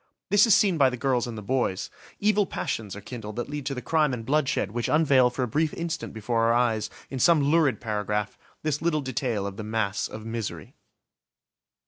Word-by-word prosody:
This 205 Hz, +3 st, +6 dB
is 215 Hz, -, +7 dB
seen 195 Hz, -6 st, +3 dB
by 135 Hz, -2 st, +6 dB
the 125 Hz, -, -5 dB
girls 125 Hz, -1 st, 0 dB
and 115 Hz, -2 st, -6 dB
the 105 Hz, -, -7 dB
boys; 120 Hz, -4 st, -1 dB, 0.3 s
evil 210 Hz, -1 st, +2 dB
passions 105 Hz, -4 st, -4 dB
are 105 Hz, -, -8 dB
kindled 105 Hz, -4 st, -7 dB
that 120 Hz, +3 st, -4 dB
lead 145 Hz, -2 st, -4 dB
to 135 Hz, -, -2 dB
the 125 Hz, -, -6 dB
crime 155 Hz, -5 st, +2 dB
and 115 Hz, -2 st, -8 dB
bloodshed 140 Hz, -7 st, +1 dB
which 120 Hz, +1 st, -2 dB
unveil 140 Hz, -5 st, +4 dB
for 125 Hz, +1 st, -3 dB
a -, -, -1 dB
brief 155 Hz, +7 st, 0 dB
instant 170 Hz, -1 st, -4 dB
before 115 Hz, +1 st, -1 dB
our 115 Hz, -, +4 dB
eyes, 115 Hz, -3 st, +1 dB, 0.2 s
in 135 Hz, -, -4 dB
some 170 Hz, +3 st, +5 dB
lurid 160 Hz, -5 st, +3 dB
paragraph, 105 Hz, -2 st, -2 dB, 0.3 s
this 150 Hz, -2 st, -1 dB
little 165 Hz, -2 st, +1 dB
detail 125 Hz, -6 st, -2 dB
of 100 Hz, 0 st, -5 dB
the 110 Hz, -, -5 dB
mass 110 Hz, -1 st, -1 dB
of 110 Hz, 0 st, -9 dB
misery. 115 Hz, -2 st, -5 dB
125 Hz, 205 wpm, -26 LUFS, 110-150 Hz, 0.3 s, is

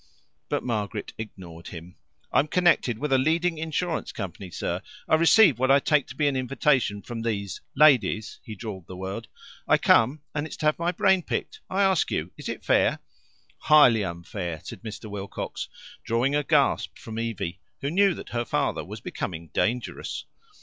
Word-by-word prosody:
But 145 Hz, -, -1 dB
Margaret 105 Hz, -5 st, -3 dB
ignored 90 Hz, -6 st, -9 dB
him. 85 Hz, +1 st, -9 dB, 0.4 s
"I'm 145 Hz, -, +3 dB
connected 170 Hz, -9 st, +3 dB
with 145 Hz, +2 st, -1 dB
a 130 Hz, -, +5 dB
leading 165 Hz, +4 st, +1 dB
insurance 165 Hz, +1 st, -2 dB
company, 95 Hz, -2 st, -6 dB
sir. 85 Hz, -, -3 dB, 0.3 s
I -, -, -1 dB
receive 165 Hz, -, +6 dB
what 130 Hz, +1 st, +2 dB
I 135 Hz, -, +7 dB
take 150 Hz, 0 st, +2 dB
to 125 Hz, -, -10 dB
be 145 Hz, +1 st, +2 dB
an 140 Hz, -, +1 dB
invitation 130 Hz, -5 st, +1 dB
from 115 Hz, +2 st, -6 dB
these 100 Hz, -5 st, -3 dB
ladies" 125 Hz, -7 st, +4 dB
(he 110 Hz, -, -8 dB
drawled 100 Hz, -5 st, -7 dB
the 90 Hz, -, -8 dB
word). 95 Hz, +4 st, -5 dB, 0.4 s
"I -, -, +5 dB
come, 135 Hz, +6 st, +3 dB
and 150 Hz, +1 st, -2 dB
it's -, -, -9 dB
to 155 Hz, -, -4 dB
have 155 Hz, +1 st, +2 dB
my 170 Hz, +1 st, +1 dB
brain 190 Hz, +1 st, +3 dB
picked. 435 Hz, -, -4 dB
I 195 Hz, +1 st, +2 dB
ask 190 Hz, -3 st, +3 dB
you, -, -, -2 dB
is -, -, -7 dB
it -, -, -6 dB
fair?" -, -, +3 dB, 0.6 s
"Highly 125 Hz, -8 st, +6 dB
unfair," 85 Hz, -2 st, -5 dB
said -, -, -9 dB
Mr. 110 Hz, -1 st, -7 dB
Wilcox, 100 Hz, -1 st, -5 dB, 0.3 s
drawing 120 Hz, +5 st, +1 dB
a 150 Hz, -, +2 dB
gasp 145 Hz, -1 st, +2 dB
from 115 Hz, -3 st, -7 dB
Evie, 100 Hz, -6 st, -3 dB, 0.2 s
who 140 Hz, -, -2 dB
knew 195 Hz, 0 st, +4 dB
that -, -, -9 dB
her 120 Hz, 0 st, -1 dB
father -, -, -1 dB
was -, -, -9 dB
becoming 85 Hz, -2 st, -5 dB
dangerous. 120 Hz, +2 st, -2 dB
125 Hz, 175 wpm, -26 LUFS, 100-155 Hz, 0.6 s, I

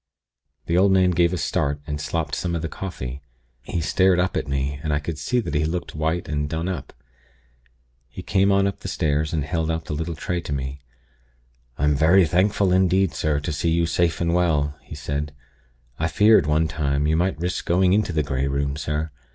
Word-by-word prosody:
"The 85 Hz, +1 st, +2 dB
old 100 Hz, +1 st, +4 dB
man 95 Hz, -1 st, +4 dB
gave 85 Hz, 0 st, +3 dB
a 90 Hz, -, -1 dB
start, 70 Hz, -2 st, -1 dB
and 75 Hz, -1 st, -4 dB
slopped 80 Hz, -1 st, -2 dB
some 85 Hz, -1 st, -1 dB
of 85 Hz, -, -3 dB
the -, -, -1 dB
coffee. 70 Hz, -7 st, -6 dB, 0.4 s
He 80 Hz, +7 st, -3 dB
stared 90 Hz, +4 st, +3 dB
up 90 Hz, +1 st, 0 dB
at -, -, -2 dB
me, 70 Hz, +1 st, -2 dB
and 75 Hz, -, -2 dB
I 75 Hz, -, +2 dB
could 75 Hz, +1 st, -5 dB
see 125 Hz, -, 0 dB
that 75 Hz, -, -5 dB
he 75 Hz, 0 st, +1 dB
looked 85 Hz, +3 st, -3 dB
white 80 Hz, +2 st, -1 dB
and 75 Hz, -1 st, -2 dB
done 80 Hz, +2 st, -2 dB
up. 90 Hz, -7 st, -4 dB, 1.2 s
He -, -, -9 dB
came 100 Hz, 0 st, +2 dB
on 100 Hz, 0 st, +3 dB
up 100 Hz, -, -2 dB
the -, -, -7 dB
stairs, 75 Hz, 0 st, 0 dB
and 80 Hz, -3 st, -1 dB
held 80 Hz, +1 st, -1 dB
out 80 Hz, 0 st, -2 dB
the -, -, -4 dB
little 80 Hz, +2 st, -3 dB
tray 90 Hz, +3 st, -3 dB
to 75 Hz, -, -7 dB
me. 65 Hz, 0 st, -4 dB, 1.0 s
'I'm 75 Hz, +1 st, +2 dB
very 85 Hz, +5 st, +5 dB
thankful 95 Hz, +3 st, +2 dB
indeed, 95 Hz, -1 st, +3 dB
sir, 75 Hz, -3 st, 0 dB
to 80 Hz, +2 st, -3 dB
see 80 Hz, +3 st, 0 dB
you 85 Hz, +1 st, +2 dB
safe 85 Hz, 0 st, 0 dB
and 85 Hz, 0 st, 0 dB
well,' 75 Hz, -5 st, +1 dB
he 65 Hz, +4 st, -10 dB
said. 75 Hz, 0 st, -4 dB, 0.6 s
'I 80 Hz, -, +1 dB
feared, 105 Hz, -1 st, +4 dB
one 80 Hz, +2 st, +2 dB
time, 70 Hz, -2 st, -1 dB
you 80 Hz, +1 st, +2 dB
might 90 Hz, +2 st, +1 dB
risk 90 Hz, +1 st, -2 dB
going 90 Hz, +1 st, +3 dB
into 105 Hz, -2 st, +2 dB
the 80 Hz, -2 st, 0 dB
Grey 70 Hz, -1 st, -1 dB
Room, 70 Hz, +1 st, -1 dB
sir. 75 Hz, +1 st, -3 dB
80 Hz, 210 wpm, -23 LUFS, 75-90 Hz, 1.2 s, very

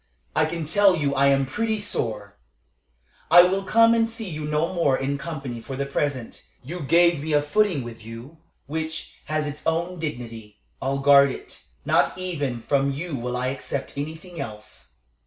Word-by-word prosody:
I -, -, +4 dB
can 165 Hz, 0 st, -4 dB
tell 195 Hz, +4 st, +4 dB
you 145 Hz, -4 st, 0 dB
I 140 Hz, 0 st, +4 dB
am 135 Hz, 0 st, +3 dB
pretty 220 Hz, -, -1 dB
sore. 105 Hz, -, -3 dB, 0.9 s
"I 175 Hz, +2 st, +10 dB
will 190 Hz, +2 st, +1 dB
come 230 Hz, +4 st, +5 dB
and 225 Hz, 0 st, +2 dB
see 225 Hz, -2 st, -5 dB
you 155 Hz, -3 st, -5 dB
no 150 Hz, +4 st, 0 dB
more 145 Hz, -7 st, +2 dB
in 140 Hz, +1 st, -2 dB
company 140 Hz, -7 st, -5 dB
for 135 Hz, +3 st, -7 dB
the 140 Hz, +1 st, -2 dB
present. 140 Hz, -3 st, -3 dB, 0.2 s
You 170 Hz, +8 st, -6 dB
gave 170 Hz, +1 st, +4 dB
me 155 Hz, +1 st, -2 dB
a 145 Hz, -, +4 dB
footing 180 Hz, -2 st, +1 dB
with 115 Hz, -2 st, -9 dB
you, 115 Hz, +8 st, -10 dB, 0.3 s
which 160 Hz, +2 st, -4 dB
has 155 Hz, 0 st, -1 dB
its 145 Hz, 0 st, -5 dB
own 170 Hz, +2 st, -1 dB
dignity. 115 Hz, -8 st, -6 dB, 0.2 s
I'll 135 Hz, +1 st, 0 dB
guard 140 Hz, 0 st, +6 dB
it; -, -, -8 dB, 0.2 s
not -, -, +2 dB
even 145 Hz, -10 st, -3 dB
from 140 Hz, +3 st, +1 dB
you 155 Hz, +3 st, -4 dB
will 125 Hz, 0 st, -3 dB
I 125 Hz, +1 st, 0 dB
accept 135 Hz, 0 st, -5 dB
anything 160 Hz, +4 st, -6 dB
else. 105 Hz, -, -9 dB
145 Hz, 175 wpm, -24 LUFS, 130-170 Hz, 0.9 s, I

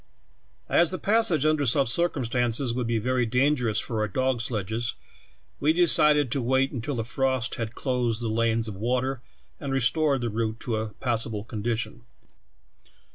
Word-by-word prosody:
"As 170 Hz, -1 st, +3 dB
the 185 Hz, -, -3 dB
passage 205 Hz, -9 st, +2 dB
under 155 Hz, -1 st, +2 dB
such 135 Hz, +1 st, +3 dB
circumstances 120 Hz, -4 st, 0 dB
would 125 Hz, -1 st, -2 dB
be 115 Hz, -1 st, 0 dB
ver^^ 125 Hz, +1 st, 0 dB
dangerous 125 Hz, -3 st, +1 dB
for 110 Hz, 0 st, -3 dB
our 105 Hz, -, +1 dB
dog 130 Hz, +4 st, 0 dB
sledges, 115 Hz, 0 st, -3 dB, 0.6 s
we 150 Hz, +2 st, +3 dB
decided 150 Hz, -5 st, +4 dB
to 135 Hz, -, 0 dB
wait 130 Hz, +2 st, +1 dB
until 130 Hz, +2 st, -4 dB
the 115 Hz, -, -2 dB
frost 130 Hz, 0 st, -1 dB
had 115 Hz, +1 st, -4 dB
closed 125 Hz, -4 st, -1 dB
the -, -, -1 dB
lanes 115 Hz, 0 st, +1 dB
of 105 Hz, -, -5 dB
water 125 Hz, +5 st, -1 dB, 0.4 s
and 140 Hz, -, -4 dB
restored 135 Hz, +2 st, +2 dB
the 120 Hz, -, -1 dB
route 110 Hz, +1 st, -2 dB
to 115 Hz, -4 st, -2 dB
a 110 Hz, 0 st, -3 dB
passable 115 Hz, -3 st, -2 dB
con 110 Hz, -2 st, -6 dB
dition. 115 Hz, +1 st, -2 dB
120 Hz, 165 wpm, -26 LUFS, 115-135 Hz, 0.6 s, decided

